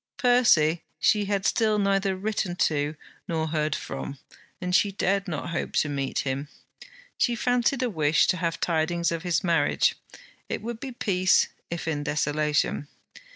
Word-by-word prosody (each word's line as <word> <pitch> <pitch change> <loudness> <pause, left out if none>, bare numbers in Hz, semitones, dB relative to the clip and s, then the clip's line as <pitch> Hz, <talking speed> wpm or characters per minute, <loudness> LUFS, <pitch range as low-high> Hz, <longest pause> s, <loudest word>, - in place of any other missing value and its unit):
Percy 220 - +4 0.2
she 210 -2 +3
had 200 -1 -1
still 215 -2 +2
neither 195 -1 +1
written 195 -2 -2
to 150 -3 0 0.3
nor 160 -1 -1
heard 155 -1 0
from, 140 - -6 0.4
and 180 0 -3
she 205 - +3
dared 195 +1 0
not 170 0 -4
hope 170 - -3
to 150 - +1
meet 140 -2 -2
him. 135 +2 -3 0.7
She 240 - +2
fancied 245 +2 +1
a 250 - +1
wish 155 -3 +3
to 185 - +2
have 165 -1 -2
tidings 170 0 0
of 165 -1 -2
his 175 -3 0
marriage: 165 -5 +2 0.6
it - - -3
would 235 0 -5
be 265 +1 -6
peace; 185 -6 +2 0.2
if 170 -1 -5
in 150 -2 -1
desolation. 150 -1 0
175 Hz, 155 wpm, -26 LUFS, 155-205 Hz, 0.7 s, Percy